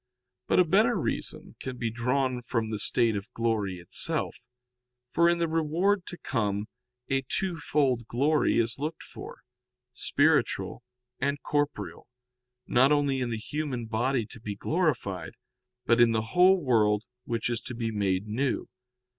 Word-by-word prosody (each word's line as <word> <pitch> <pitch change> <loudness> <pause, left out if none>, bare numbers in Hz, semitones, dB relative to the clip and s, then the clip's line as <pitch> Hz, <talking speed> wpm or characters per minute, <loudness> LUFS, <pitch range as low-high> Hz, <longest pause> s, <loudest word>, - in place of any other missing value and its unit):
But - - +2
a 180 - +6
better 215 +8 +4
reason - - -3
can 130 -1 -5
be 115 -2 -2
drawn 125 +2 0
from 115 -2 -2
the 105 - -2
state 115 0 +2
of 100 +4 -5
glory 110 -5 0
itself. 90 0 -2 0.8
For 170 +4 +4
in 170 - +2
the 170 0 +1
reward 165 +5 +1
to 175 - -6
come 105 -8 -1 0.4
a 135 0 +1
two 180 -3 -1
fold 135 -6 +1
glory 145 +7 +2
is 115 +2 0
looked 155 +3 -4
for, - - -10 0.5
spiritual - - +1 0.4
and 140 0 0
corporeal, 145 -4 -2 0.6
not 130 +4 +4
only 145 -2 +2
in 125 -2 -1
the 115 - -2
human 130 0 -3
body 115 +2 0
to 115 +3 -11
be 105 -2 -4
glorified, 135 - -1 0.5
but 115 0 +4
in 115 -1 +5
the 110 0 -1
whole 185 +2 +6
world 105 -5 +3 0.2
which 115 -2 -1
is 120 -1 -2
to 130 - -6
be 115 -1 -2
made 100 -2 0
new. 125 +6 -1
125 Hz, 155 wpm, -28 LUFS, 115-150 Hz, 0.8 s, a